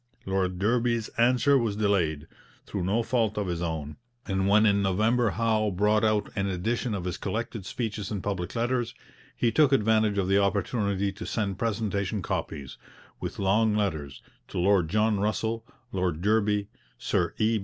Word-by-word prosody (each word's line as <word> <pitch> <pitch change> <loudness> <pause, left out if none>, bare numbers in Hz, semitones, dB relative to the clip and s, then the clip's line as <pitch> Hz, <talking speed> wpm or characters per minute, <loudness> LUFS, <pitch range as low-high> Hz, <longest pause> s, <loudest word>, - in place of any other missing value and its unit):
Lord 95 -1 0
Derby's 115 +2 +1
answer 125 +4 +3
was 115 -4 -1
delayed, 90 -8 +1 0.4
through 100 -3 -3
no 110 +5 +1
fault 115 -3 0
of 105 - 0
his 85 -2 -3
own, 80 -3 -4 0.3
and 95 -1 0
when 105 +2 +5
in 100 -1 +3
November 110 +5 +2
Howe 110 0 +1
brought 105 +3 +2
out 110 -1 +1
an 100 -2 0
edition 110 +5 -1
of 95 - -4
his 90 - -3
collected 110 -1 -4
speeches 110 -4 -3
and 100 -4 -4
public 95 -2 -3
letters, 120 0 -1 0.4
he 120 - +2
took 150 0 +4
advantage 110 -4 +3
of 95 -2 +1
the 95 +1 +4
opportunity 100 0 0
to 95 - -8
send 100 -4 -2
presentation 105 -3 -1
copies, 70 -4 -4 0.4
with - - -5
long 105 +3 +2
letters, 80 -10 -2 0.2
to - - -7
Lord 90 -2 +3
John 105 +1 +2
Russell, 110 +2 -1 0.2
Lord 90 -3 -1
Derby, 105 -1 +2 0.3
Sir 85 - -1
E. 110 0 +2
105 Hz, 165 wpm, -27 LUFS, 95-110 Hz, 0.4 s, when